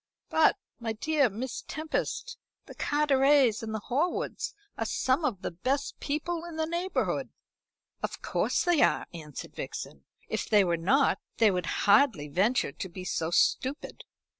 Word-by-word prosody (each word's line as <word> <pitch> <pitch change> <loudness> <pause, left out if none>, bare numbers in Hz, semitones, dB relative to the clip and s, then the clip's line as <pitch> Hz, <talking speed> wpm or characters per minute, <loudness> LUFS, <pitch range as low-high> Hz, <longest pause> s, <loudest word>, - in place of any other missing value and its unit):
"But, 320 - +4 0.2
my 225 -2 -2
dear 285 +3 +2
Miss 235 +5 -5
Tempest, 320 +10 -3 0.3
the - - -11
Carterets 280 -5 +3
and 225 -1 -5
the 220 -1 -3
Horwoods 355 - -1 0.2
are - - -2
some 260 +5 +1
of 220 -11 -1
the - - -2
best 260 +11 -2
people 325 +3 -2
in 340 -2 -8
the 320 0 0
neighbourhood." 345 +3 -1 0.7
"Of - - -3
course 450 - +1
they 350 -6 +3
are," - - +3
answered 150 -4 -8
Vixen. 70 -1 -6 0.2
"If - - -3
they 210 -2 +6
were 175 -2 +1
not 230 +13 +2 0.2
they 220 -2 +5
would 180 -3 -2 0.2
hardly 205 - +4
venture 195 - +2
to 190 - -6
be 180 +1 -8
so 165 -2 -1
stupid. 260 - 0
260 Hz, 155 wpm, -29 LUFS, 195-310 Hz, 0.7 s, they